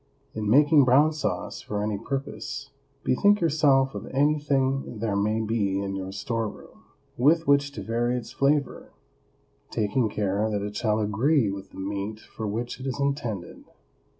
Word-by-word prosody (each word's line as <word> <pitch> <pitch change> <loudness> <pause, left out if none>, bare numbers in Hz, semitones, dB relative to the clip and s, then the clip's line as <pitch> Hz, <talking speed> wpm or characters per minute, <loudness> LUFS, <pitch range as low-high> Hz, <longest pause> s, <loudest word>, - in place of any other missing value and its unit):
In 105 -1 -2
making 145 +4 +6
brown 140 +5 +5
sauce 105 - -3
for 105 0 -3
any 105 -1 -2
purpose, 135 - -5 0.3
bethink 205 +10 +3
yourself 140 -5 +3
of - - -6
anything 135 -3 +1
there 105 -1 -1
may 105 +2 +1
be 105 -3 0
in 100 0 -3
your 95 0 -5
store 115 +2 -2
room - - -15 0.3
with 160 +6 +4
which 140 -1 +3
to 105 - -6
vary 120 +3 0
its 120 - -7
flavor, 140 0 0 0.8
taking 110 +2 0
care 105 +1 0
that 105 -2 -2
it 105 0 -5
shall 105 0 +1
agree 110 +3 +2
with 100 0 -7
the - - -15
meat 100 +2 -4
for 110 0 -7
which 115 +5 -4
it 130 - -5
is 135 +1 -3
intended. 120 -10 -3
115 Hz, 160 wpm, -26 LUFS, 105-140 Hz, 0.8 s, making